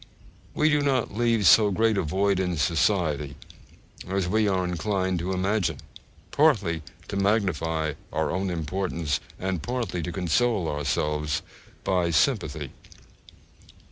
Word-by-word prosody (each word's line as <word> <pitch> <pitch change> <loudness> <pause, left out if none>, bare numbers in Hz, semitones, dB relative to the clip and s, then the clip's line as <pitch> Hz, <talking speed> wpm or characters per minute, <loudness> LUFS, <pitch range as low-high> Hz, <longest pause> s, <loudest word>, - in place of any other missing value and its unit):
We 155 - +3
do 150 -1 +3
not 130 -7 0
leave 115 -2 +2
so 105 +2 +7
great 110 +3 +2
a 100 - +1
void 95 +4 +1
in 90 -2 -1
society 75 -1 +1 0.7
as 95 -1 -1
we 110 +3 +2
are 95 -2 +1
inclined 95 0 -1
to 90 +3 -3
imagine, 95 +1 0 0.5
partly 105 - +2 0.3
to - - -4
magnify 85 -6 0 0.2
our - - -1
own 95 +1 -1
importance, 85 -2 -2 0.2
and 95 -3 -2
partly 115 -7 -3
to 90 - -4
console 95 +2 +1
ourselves 75 +1 -1 0.4
by 90 -2 +1
sympathy. 75 - 0
95 Hz, 125 wpm, -26 LUFS, 80-105 Hz, 0.7 s, so